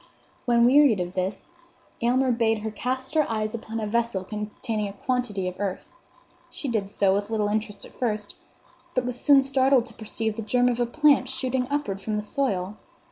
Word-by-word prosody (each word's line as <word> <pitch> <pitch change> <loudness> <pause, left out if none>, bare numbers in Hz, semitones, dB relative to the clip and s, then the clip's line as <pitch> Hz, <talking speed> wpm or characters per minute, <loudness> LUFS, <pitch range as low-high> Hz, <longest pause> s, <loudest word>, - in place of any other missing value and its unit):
When 235 -1 +4
wearied 265 -4 +6
of 180 0 -3
this, 190 - -3 0.5
Aylmer 255 +2 +2
bade 225 -2 +1
her 220 - -3
cast 260 +4 -3
her 310 -2 +2
eyes 215 -1 -1
upon 225 0 -5
a 215 - -2
vessel 230 -3 0
containing 210 +2 -4
a 200 - -7
quantity 210 -4 -2
of 180 - -3
earth. 200 -2 -3 0.6
She 290 - -7
did 215 -5 -1
so, 195 -1 +2
with 205 +1 -1
little 215 -2 0
interest 210 -1 -3
at - - -15
first; 210 -4 -2 0.6
but 255 -1 +1
was 250 0 -4
soon 280 -2 +6
startled 265 -2 +3
to - - -15
perceive 220 0 -4
the - - -2
germ 245 +3 +2
of 245 -1 -1
a 240 - +1
plant 285 -1 +3
shooting 260 -1 -1
upward 210 -10 -2
from 215 +2 -2
the 210 - -2
soil. 210 -5 -2
225 Hz, 190 wpm, -25 LUFS, 210-255 Hz, 0.6 s, wearied